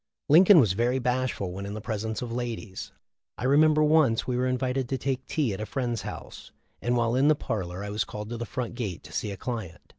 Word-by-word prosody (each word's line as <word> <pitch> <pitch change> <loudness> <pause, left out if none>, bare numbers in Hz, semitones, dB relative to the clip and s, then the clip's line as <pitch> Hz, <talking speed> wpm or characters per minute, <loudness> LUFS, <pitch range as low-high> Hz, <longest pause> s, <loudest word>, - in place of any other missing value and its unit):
Lincoln 175 +4 +8
was 110 -9 +4
very 120 +5 +1
bashful 125 -6 -1
when 100 +2 -6
in 100 - -5
the - - -4
presence 110 +1 -3
of 120 - -5
ladies. 120 -6 -5 0.5
I - - -6
remember 155 +3 +5
once 150 -7 +3
we 125 - -1
were 125 +1 +1
invited 130 0 -1
to 135 - 0
take 130 0 -3
tea 140 -9 0
at 95 - -5
a - - -2
friend's 120 -4 -2
house, - - -8 0.3
and 120 +1 +1
while 115 -1 +1
in 135 +3 +3
the 155 - +5
parlor 95 -7 -4
I 100 - -5
was 105 0 0
called 105 +1 -7
to 120 - -4
the 120 - -4
front 125 -4 -4
gate 105 -8 -4
to - - -12
see 105 - -2
a 100 - -6
client. 110 -9 -5
120 Hz, 235 wpm, -27 LUFS, 105-130 Hz, 0.5 s, Lincoln